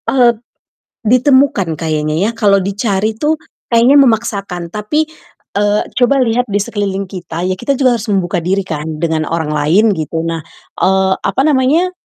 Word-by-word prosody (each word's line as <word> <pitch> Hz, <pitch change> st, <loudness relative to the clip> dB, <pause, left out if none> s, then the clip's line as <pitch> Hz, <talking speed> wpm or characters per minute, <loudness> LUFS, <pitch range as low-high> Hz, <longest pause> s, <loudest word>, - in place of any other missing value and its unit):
Eee 245 Hz, -3 st, +4 dB
t -, -, -25 dB, 0.6 s
ditemukan 255 Hz, -, +3 dB
kayaknya 155 Hz, -1 st, -2 dB
ya, 200 Hz, +8 st, +1 dB
kalau 200 Hz, -4 st, +2 dB
dicari 200 Hz, +1 st, -1 dB
tuh 305 Hz, +2 st, +1 dB, 0.3 s
kayaknya 240 Hz, +4 st, +5 dB
memaksakan, 200 Hz, -8 st, 0 dB
tapi, 215 Hz, -, -1 dB, 0.5 s
eee, 205 Hz, +1 st, +1 dB, 0.2 s
coba 250 Hz, +2 st, +3 dB
lihat 245 Hz, +1 st, 0 dB
di 205 Hz, -, -4 dB
sekeliling 200 Hz, -2 st, -3 dB
kita, 175 Hz, -2 st, -6 dB
ya 185 Hz, 0 st, -2 dB
kita 275 Hz, +3 st, 0 dB
juga 255 Hz, -3 st, +2 dB
harus 220 Hz, -, -7 dB
membuka 190 Hz, -3 st, 0 dB
diri 190 Hz, +4 st, -1 dB
kan 155 Hz, -4 st, -5 dB, 0.2 s
dengan 160 Hz, -1 st, 0 dB
orang 160 Hz, -2 st, -2 dB
lain 160 Hz, +9 st, +3 dB
gitu. 160 Hz, -2 st, -3 dB
Nah, 165 Hz, 0 st, -2 dB, 0.4 s
eee, 190 Hz, 0 st, +2 dB
apa 195 Hz, +7 st, -1 dB
namanya, 300 Hz, +5 st, +2 dB
200 Hz, 160 wpm, -15 LUFS, 175-240 Hz, 0.6 s, kayaknya